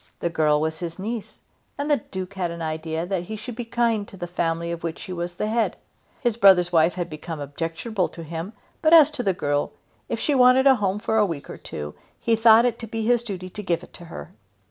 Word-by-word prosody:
The 170 - -1
girl 150 -2 +3
was 160 +1 -2
his 170 -2 -5
niece 215 +3 -5 0.4
and 285 +1 -2
the 290 - +5
Duke 190 -3 -7
had 185 -3 -2
an 170 0 -6
idea 160 +1 -3
that 180 -1 -2
he 220 - -5
should 220 +3 -7
be 240 0 -5
kind 230 -3 0
to 195 - -12
the 175 - -4
family 170 -1 -2
of 170 -1 -4
which 165 -1 -5
he 185 - -6
was 175 0 -4
the 210 - -2
head. 225 +1 +1 0.5
His 240 -3 0
brother's 185 -5 +6
wife 165 0 +4
had 175 -2 -2
become 155 +1 -7
objectionable 165 - -3
to 165 - -9
him, 165 +5 -6 0.3
but 320 +1 +6
as 310 -2 +8
to 295 -4 -3
the 195 -6 +1
girl, 145 -3 -1 0.4
if - - -2
she 295 - +1
wanted 255 0 +6
a 270 - +8
home 195 -2 0
for 220 +1 -1
a 210 - +5
week 160 -5 -6
or - - -8
two, 75 0 -7 0.3
he 230 - +2
thought 225 +1 +6
it 240 -2 0
to 230 - -6
be 225 0 -3
his 240 0 +3
duty 185 -5 -6
to 210 - -6
give 175 -3 -1
it - - -15
to 175 - -12
her. 165 - -9
185 Hz, 245 wpm, -24 LUFS, 165-225 Hz, 0.5 s, as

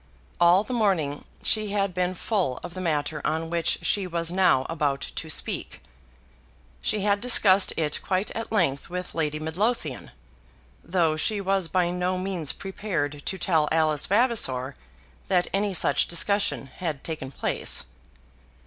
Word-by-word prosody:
All 175 +3 +6
the 255 - -5
morning 185 -11 0 0.2
she 215 -1 +2
had 195 -2 0
been 180 +1 0
full 180 - -1
of 175 - -7
the 185 - -5
matter 150 -3 -1
on 160 +1 -1
which 170 -1 +1
she 200 -2 0
was 170 -1 -2
now 180 -8 +3
about 145 -3 -1
to - - -5
speak. - - -1 1.0
She 210 - 0
had 200 0 +2
discussed 200 -6 +4
it 150 -2 -1
quite 190 +1 -1
at 225 - -5
length 165 -10 +1
with 180 0 -5
Lady 150 -2 -1
Midlothian; 160 - -2 0.7
though 165 -2 +1
she 205 +6 0
was 195 -2 0
by 175 0 +1
no 180 +1 -1
means 185 -5 0
prepared 175 -8 -4
to 190 - -1
tell 160 -5 +2
Alice 155 -2 +2
Vavasor 195 - +2 0.5
that 180 -2 +2
any 200 +1 +1
such 185 - +2
discussion 170 - +1
had 155 0 -5
taken 155 -5 -5
place. - - -1
175 Hz, 150 wpm, -26 LUFS, 155-195 Hz, 1.0 s, All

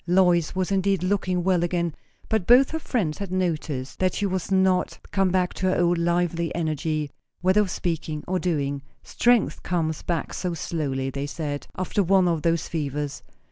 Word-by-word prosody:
Lois 175 -2 +3
was 185 +1 -1
indeed 195 -1 +1
looking 185 -2 0
well 185 -1 +2
again; 170 -1 0 0.3
but 220 -5 0
both 255 +3 +6
her 320 - -2
friends 210 - -1
had 200 -3 -5
noticed 155 -7 -2
that 185 0 +1
she 205 - 0
was 190 -1 -2
not 190 -1 +2
come 195 -2 +2
back 180 0 +1
to 185 - -1
her - - +1
old 175 -1 +3
lively 170 -1 0
energy, 155 -2 -1 0.3
whether 185 +4 +4
of 200 - -1
speaking 160 -4 -3
or 185 0 0
doing. 145 -6 -1 0.2
Strength 240 -3 +2
comes 160 -3 -1
back 170 -2 -2
so 180 -2 -2
slowly, 135 -5 -2
they 140 +1 -3
said, 145 0 -4
after 185 +2 0
one 190 0 +4
of 165 -3 +1
those 165 +1 +1
fevers. 145 -2 -3
175 Hz, 180 wpm, -25 LUFS, 155-185 Hz, 0.3 s, both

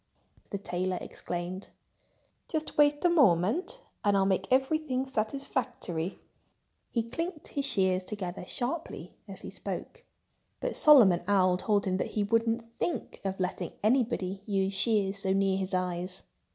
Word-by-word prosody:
the 200 - -3
tailor 185 -1 -2
exclaimed. 175 +2 -5 0.8
"Just 315 -1 -3
wait 295 +1 +4
a - - +6
moment 290 - +3 0.2
and 205 -1 +3
I'll 195 - +3
make 190 -2 +1
everything 265 0 +1
satisfactory." 220 - -3 0.7
He 230 - 0
clinked 330 +7 -4
his 280 -1 -2
shears 190 -7 +2
together 185 -2 -5
sharply 295 +7 -4
as - - -5
he - - -8
spoke. 480 - -6 0.6
But - - -2
Solomon 230 - +7
Owl 185 -3 +4
told 200 +2 +1
him 185 -1 0
that - - -3
he 210 - +3
wouldn't 230 +2 +1 0.2
think 345 - -3
of 195 -1 -3
letting 180 -1 -2
anybody 215 -5 +1
use 195 -1 0
shears 200 -1 +2
so 190 -1 +1
near 195 0 +2
his 190 0 -2
eyes. 180 0 -2
205 Hz, 140 wpm, -29 LUFS, 185-265 Hz, 0.8 s, Solomon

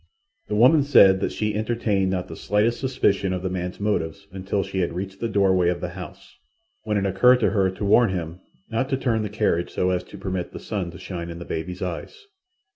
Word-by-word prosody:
The 105 - -2
woman 130 +8 +6
said 100 -9 +6
that - - -1
she 105 -1 -2
entertained 105 -3 0
not 95 -1 -2
the - - -8
slightest 105 +3 0
suspicion 100 -8 +1
of 90 0 -4
the 95 - -2
man's 90 -1 -4
motives 100 -3 -2
until 95 +1 -2
she 95 - -4
had 85 -2 0
reached 95 +2 -5
the 115 - -2
doorway 95 -4 +3
of 90 -1 -1
the 90 - -4
house, 90 0 -11 0.4
when 105 -1 -1
it 100 - 0
occurred 110 +7 +5
to - - +3
her 95 -3 +2
to 95 +2 -5
warn 110 +3 +5
him 85 -2 -4 0.3
not 125 +4 -2
to 135 - 0
turn 115 -4 0
the 105 - -3
carriage 105 -5 0
so 90 0 0
as 90 - -1
to - - -11
permit 95 -2 -4
the - - -7
sun 95 -5 -4
to 85 - -10
shine 90 -2 -6
in 85 - -7
the 85 - -8
baby's 90 +3 -4
eyes. 420 - -6
95 Hz, 225 wpm, -24 LUFS, 90-110 Hz, 0.4 s, woman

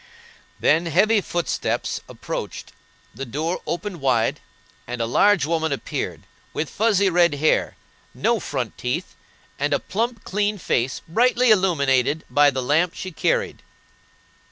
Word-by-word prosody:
] - - -28
Then 165 +3 +3
heavy 205 +6 +3
footsteps 175 -1 -2
approached, - - -6 0.4
the 135 - -6
door 150 +8 -3
opened 175 -1 -4
wide, 120 -4 +1 0.5
and 125 0 -5
a 115 - +1
large 200 - +3
woman 160 0 0
appeared, 140 - -4 0.3
with 155 - -3
fuzzy 205 -2 +2
red 170 -3 +4
hair, 155 +2 +1 0.4
no - - +1
front - - -4
teeth, - - -3 0.5
and 145 +1 0
a - - 0
plump, 230 +2 -3
clean 205 +1 -1
face, 130 -7 -1
brightly 245 +6 +3
illuminated 145 - +2
by 145 0 +5
the 130 -2 -3
lamp 165 +7 +2
she 185 - -6
carried. 475 - -1
165 Hz, 135 wpm, -23 LUFS, 140-205 Hz, 0.5 s, by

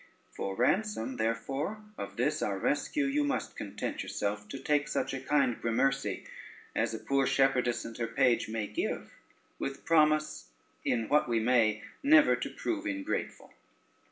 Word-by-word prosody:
For 95 - -3
ransom, 130 - 0
therefore, 135 - -2
of - - -7
this - - +1
our - - 0
rescue, 290 -2 0
you 285 +2 +1
must 285 -2 -2
content 100 - -4
yourself 100 0 -3
to - - -5
take 145 +2 +1
such 150 - -1
a 135 - -2
kind 135 -3 +1
gramercy 115 -2 0 0.5
as - - 0
a - - -5
poor 135 -1 +1
shepherdess 130 -3 +2
and 115 - -7
her 115 - 0
page 120 -1 +2
may 110 -1 -2
give, - - -3 0.5
with 135 0 -4
promise, 155 - +2 0.3
in 115 -3 0
what 150 -4 +3
we 115 -1 +2
may, 110 -2 +3 0.2
never 295 +2 +6
to - - -4
prove 320 -2 -3
ingrateful. 290 +1 -3
135 Hz, 155 wpm, -31 LUFS, 115-155 Hz, 0.5 s, never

